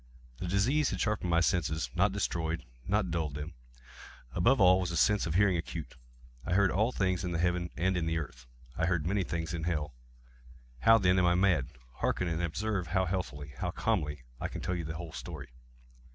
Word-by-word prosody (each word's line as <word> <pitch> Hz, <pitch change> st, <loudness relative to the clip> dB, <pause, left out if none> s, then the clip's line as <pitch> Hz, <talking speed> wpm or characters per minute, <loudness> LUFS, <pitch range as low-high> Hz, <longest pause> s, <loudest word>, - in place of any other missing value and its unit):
The 90 Hz, -, -3 dB
disease 125 Hz, +11 st, +2 dB
had -, -, -3 dB
sharpened 105 Hz, -4 st, 0 dB
my 85 Hz, 0 st, +4 dB
senses—not 85 Hz, +3 st, +1 dB
destroyed—not 85 Hz, -, -2 dB
dulled 80 Hz, -4 st, -2 dB
them. 75 Hz, +3 st, -6 dB, 0.8 s
Above 125 Hz, +10 st, +3 dB
all 95 Hz, -1 st, +6 dB
was 90 Hz, -2 st, -1 dB
the 85 Hz, -, -2 dB
sense 105 Hz, +3 st, +3 dB
of 80 Hz, -, -2 dB
hearing 95 Hz, -2 st, +4 dB
acute. 80 Hz, -5 st, -6 dB, 0.5 s
I 90 Hz, -, -1 dB
heard 100 Hz, -1 st, +4 dB
all 110 Hz, +6 st, +2 dB
things 95 Hz, -5 st, 0 dB
in 90 Hz, -1 st, -2 dB
the -, -, 0 dB
heaven 90 Hz, 0 st, 0 dB
and 95 Hz, +2 st, +1 dB
in 85 Hz, -2 st, -1 dB
the 80 Hz, 0 st, 0 dB
earth. 60 Hz, -6 st, -6 dB, 0.3 s
I 85 Hz, -, 0 dB
heard 85 Hz, -4 st, 0 dB
many 95 Hz, +2 st, +1 dB
things 85 Hz, -1 st, -3 dB
in 85 Hz, -1 st, -3 dB
hell. 75 Hz, -4 st, -1 dB, 0.9 s
How, 115 Hz, -, +7 dB
then, 95 Hz, -3 st, +3 dB
am 90 Hz, -, +4 dB
I 90 Hz, -, +4 dB
mad? 90 Hz, -7 st, +3 dB, 0.3 s
Hearken! 90 Hz, -, 0 dB
and 85 Hz, 0 st, -1 dB
observe 90 Hz, +2 st, -1 dB
how 95 Hz, +3 st, +1 dB
healthily—how 85 Hz, -3 st, -4 dB
calmly 75 Hz, -, -1 dB, 0.2 s
I -, -, -2 dB
can -, -, -7 dB
tell 90 Hz, -, -2 dB
you 85 Hz, -2 st, -3 dB
the 80 Hz, +1 st, -5 dB
whole 85 Hz, -3 st, -7 dB
story. 75 Hz, -6 st, -7 dB
90 Hz, 195 wpm, -31 LUFS, 80-95 Hz, 0.9 s, How